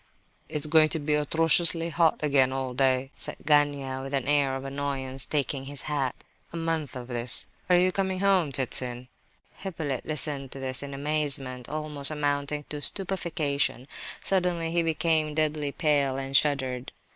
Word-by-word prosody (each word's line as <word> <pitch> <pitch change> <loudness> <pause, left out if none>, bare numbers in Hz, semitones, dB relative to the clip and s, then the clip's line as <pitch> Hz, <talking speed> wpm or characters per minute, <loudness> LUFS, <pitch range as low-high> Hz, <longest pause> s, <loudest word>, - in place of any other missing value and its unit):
"It's 150 0 -1
going 155 0 +5
to 160 - -2
be 150 +1 -1
atrociously 165 +3 +2
hot 165 -2 +2
again 135 -3 +4
all 130 -1 -3
day," 130 +1 +1
said - - +2
Gania, 145 -3 +2
with 135 +1 -4
an 135 -1 -1
air 140 -2 +2
of 135 0 -6
annoyance, 135 -1 -3
taking 140 -2 -1
his 140 0 -5
hat. 140 -4 -1 0.4
"A 170 - -6
month 165 -4 -2
of 125 -1 -7
this... 120 -1 -1 0.2
Are 180 - +6
you 185 +1 +3
coming 190 0 -1
home, 190 -6 +3
Ptitsin?" 125 -1 -2 0.5
Hippolyte 160 -9 -4
listened 145 -3 +1
to 135 - -8
this 130 -1 -1
in 140 -1 -6
amazement, 140 -4 -1
almost 150 -2 +2
amounting 145 -1 -1
to 150 -1 -3
stupefaction. 155 -9 0 0.4
Suddenly 180 -3 0
he 170 0 +2
became 160 -1 +1
deadly 155 -2 0
pale 140 -4 +1
and 135 0 -4
shuddered. 130 -4 +1
145 Hz, 155 wpm, -27 LUFS, 135-155 Hz, 0.5 s, Are